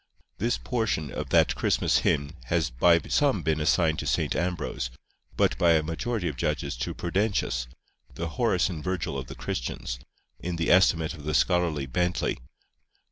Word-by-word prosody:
This 120 +4 +1
portion 110 - -1
of - - -5
that - - +4
Christmas - - +2
hymn 70 0 +1
has 80 0 0
by 85 +8 +5
some 140 - +1
been 80 0 +1
assigned 80 0 +2
to - - -4
St. - - 0
Ambrose, 85 -7 -2 0.5
but - - +3
by 85 -1 +5
a 80 -1 +3
majority 90 +5 -2
of 75 - -3
judges - - -1
to 65 - -3
Prudentius, 90 - -1 0.5
"the 85 0 -3
Horace 110 -2 +1
and 85 -6 -5
Virgil 90 -6 -2
of 65 -2 -4
the - - -8
Christians," - - -4 0.4
in 90 0 -3
the 85 -1 0
estimate 85 -3 +4
of 75 -4 -11
the 75 +1 -1
scholarly 85 -6 +2
Bentley. 90 +7 -1
85 Hz, 165 wpm, -27 LUFS, 75-90 Hz, 0.5 s, by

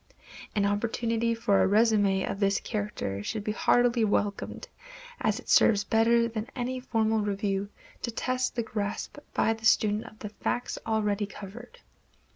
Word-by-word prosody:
Any 200 -1 +2
opportunity 230 +2 0
for 205 -3 +2
a - - +4
résumé 205 -2 +3
of 195 - -4
this 200 -1 +2
character 205 - -3
should 210 - -4
be 215 - -1
heartily 240 +2 +3
welcomed, 205 -1 -1 0.5
as - - 0
it - - -14
serves 205 -2 +5
better 230 +1 +3
than 225 -1 -5
any 255 0 -2
formal 225 -3 +1
review 200 -1 -1 0.3
to - - -2
test 255 +2 -1
the 235 - 0
grasp 210 +5 -4 0.2
by 225 - +3
the 225 0 -12
student 215 -1 +3
of 215 - -12
the 210 - -6
facts 240 +3 -3
already 210 -2 0
covered. 210 +4 -10
215 Hz, 155 wpm, -28 LUFS, 205-230 Hz, 0.5 s, serves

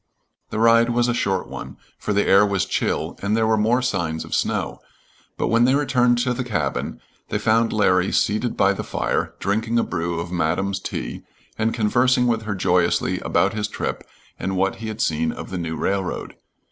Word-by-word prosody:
The - - -4
ride 115 +1 +5
was 120 0 +2
a 120 - +1
short 95 -5 -1
one, - - -8 0.2
for - - -3
the 100 0 +2
air 100 +1 +6
was 100 -3 +1
chill, - - -1
and 105 +2 0
there 110 - +2
were 110 0 +3
more 115 +4 +2
signs 85 -10 -1
of - - -8
snow, - - -1 0.6
but - - 0
when 115 +1 +4
they 130 +2 +4
returned 125 -4 +3
to 125 -1 0
the 125 - -3
cabin, 120 -4 -2 0.3
they - - 0
found 115 +1 +2
Larry 95 -3 +2
seated 110 +4 0
by 100 +1 +4
the - - -5
fire, - - -2
drinking 110 +3 0
a 115 - +3
brew 85 0 -2
of 85 +1 -5
Madam's 90 +3 0
tea - - -5 0.3
and 110 +1 0
conversing 125 +3 +2
with 115 -2 0
her 105 -2 -2
joyously 90 -1 +1
about 100 - +1
his 105 -1 -2
trip - - -4 0.4
and 95 0 -2
what 95 +1 +1
he 115 - -6
had 110 0 -4
seen 80 +1 +1
of - - -8
the 95 - -3
new 80 -1 -3
railroad. 95 -2 -2
105 Hz, 195 wpm, -22 LUFS, 95-115 Hz, 0.6 s, air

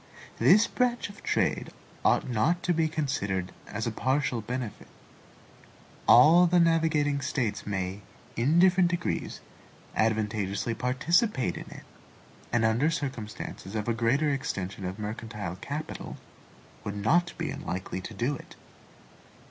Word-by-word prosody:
This 215 +3 +6
branch 245 -2 0
of 200 - -13
trade - - 0 0.3
ought - - +3
not 130 +9 +1
to 175 - +2
be 165 -1 +2
considered 100 - -2 0.2
as 105 +1 -4
a 115 - -1
partial 130 0 0
benefit. 120 -1 -5 1.2
All 175 +3 +8
the 175 +1 +4
navigating 160 -4 +2
States 120 -8 -2
may, 95 0 -3 0.3
in 140 +8 +2
different 180 0 +5
degrees, 175 0 -3 0.5
advantageously 110 -1 0
participate 130 - +1
in - - -8
it, - - -11 0.7
and 115 -1 +2
under 115 +8 +3
circumstances 110 -8 -5
of 105 0 -2
a 120 - +2
greater 130 +7 +2
extension 100 -8 -3
of 95 +1 -4
mercantile 105 -3 -5
capital, 150 +8 -6 0.7
would 100 - -4
not 175 +12 +2
be - - -2
unlikely 95 0 -4
to 105 - -8
do 125 +8 0
it. - - -12
125 Hz, 130 wpm, -28 LUFS, 105-160 Hz, 1.2 s, All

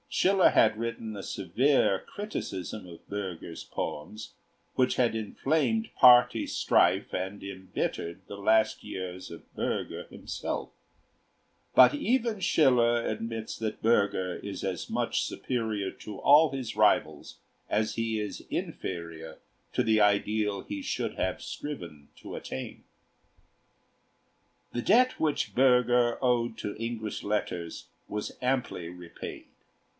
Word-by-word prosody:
Schiller 190 0 +4
had 110 -1 +4
written 115 -1 -4
a 100 - -6
severe 100 - +2
criticism 110 - -5
of 85 -1 -13
Bürger's 95 -5 -5
poems, 105 +9 -5 0.4
which 130 0 +2
had 120 -2 +2
inflamed 160 - 0
party 125 -1 +7
strife - - +2
and 95 +2 -3
embittered 95 -2 -4
the 100 - -7
last 110 +2 +2
years 90 0 -6
of 85 - -10
Bürger - - -3
himself; - - -5 1.0
but 125 -1 +8
even 230 - 0
Schiller 120 -9 +3
admits 115 0 -4
that 110 -1 -4
Bürger 100 -5 +1
is 100 -1 -5
as 95 -2 -3
much - - 0
superior 110 -6 -2
to 105 -2 -9
all 150 +2 +6
his 130 -4 -5
rivals - - +2 0.3
as 110 +1 +1
he 115 -1 -1
is 105 -1 -4
inferior 80 -3 -5 0.3
to 125 - +1
the 110 -2 +3
ideal 105 0 +2
he 100 -1 -6
should - - -2
have - - -2
striven 85 - -7
to - - -8
attain. 65 - -6 1.9
The 120 - -1
debt 255 - +4
which 155 -2 0
Bürger 125 -2 +4
owed 120 -3 +1
to 105 - -4
English 115 -1 -4
letters 90 -5 -3 0.2
was 105 0 -4
amply 125 -9 -1
repaid. 90 -1 -9
110 Hz, 120 wpm, -29 LUFS, 95-125 Hz, 1.9 s, but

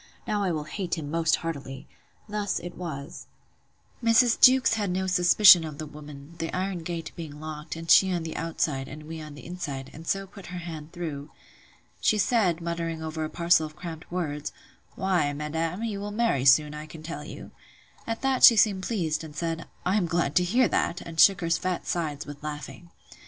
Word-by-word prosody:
—Now 205 -3 0
will 155 -2 -3
I - - -13
hate 180 -1 -3
him 145 -2 -5
most 165 0 +2
heartily. 140 -5 -6 0.4
Thus 210 -1 -2
it 175 - -8
was:— 155 -4 -7 0.8
Mrs. 230 +1 +4
Jewkes 260 -2 +7
had 210 -3 -1
no 185 +1 -1
suspicion 180 0 +7
of 155 -2 -7
the 155 - -5
woman, 150 0 -11
the 165 - -3
iron 185 0 -2
gate 165 0 -5
being 155 -4 -8
locked, 155 0 -6
and 165 0 -8
she 190 +3 +6
on 175 -2 -1
the 160 - -6
outside, 150 -4 -2
and 150 +2 -9
we 160 +1 -7
on 150 -1 -9
the 145 - -12
inside; 150 -7 -6
and 160 +2 -11
so 195 0 0
put 195 -1 -13
her 180 - -6
hand 165 -3 -7
through. 155 -5 -6 0.7
She 215 - +2
said, 190 -5 +2
muttering 165 -1 -3
over 160 0 -4
a 155 - -3
parcel 170 -2 +3
of 155 - -15
cramp 165 -1 -8
words; 150 -4 -3 0.4
Why, 175 -7 +1
madam, 160 +6 -3
you 215 -3 -3
will 205 +1 -4
marry 205 - 0
soon, 150 +2 +5
I 150 +1 -7
can 155 0 -11
tell 155 -2 -6
you. - - -10 0.6
At 230 +2 -3
that 265 -1 +1
she 235 - +11
seemed 200 -3 +3
pleased, 170 -8 -1
and 155 -2 -10
said, 165 0 -3 0.2
I 190 +3 +2
am 180 -5 +1
glad 165 -4 0
to 180 - +4
hear 235 +7 +3
that; 175 - 0
and 165 -1 -8
shook 195 -1 +6
her 165 - -2
fat 180 +1 -1
sides 155 -4 -2
with 145 0 -9
laughing. 150 +3 -7
165 Hz, 200 wpm, -27 LUFS, 155-185 Hz, 0.8 s, she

